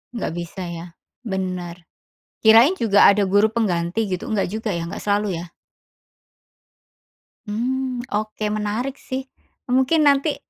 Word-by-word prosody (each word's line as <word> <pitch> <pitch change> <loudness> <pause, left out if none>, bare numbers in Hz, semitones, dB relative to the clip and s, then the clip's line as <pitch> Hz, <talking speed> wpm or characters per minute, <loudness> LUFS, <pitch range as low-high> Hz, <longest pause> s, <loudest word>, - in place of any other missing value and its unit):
Nggak 225 - -3
bisa 170 +3 -7
ya. 170 0 -7 0.4
Bener. 180 -3 -4 0.6
Kirain 230 +11 +7
juga 205 -3 +5
ada 200 0 +4
guru 205 +3 +4
pengganti 200 -2 0
gitu, 185 - -3
nggak 210 -3 +1
juga 220 0 -3
ya, 170 - -3
nggak 170 - -7
selalu 205 -4 0
ya? 175 - -10 2.0
Hmm, 250 +3 -2
oke. 215 0 -2
Menarik 215 +6 -3
sih, 260 0 -5 0.5
mungkin 265 +5 +3
nanti 285 +1 +3
215 Hz, 125 wpm, -22 LUFS, 190-245 Hz, 2.0 s, Kirain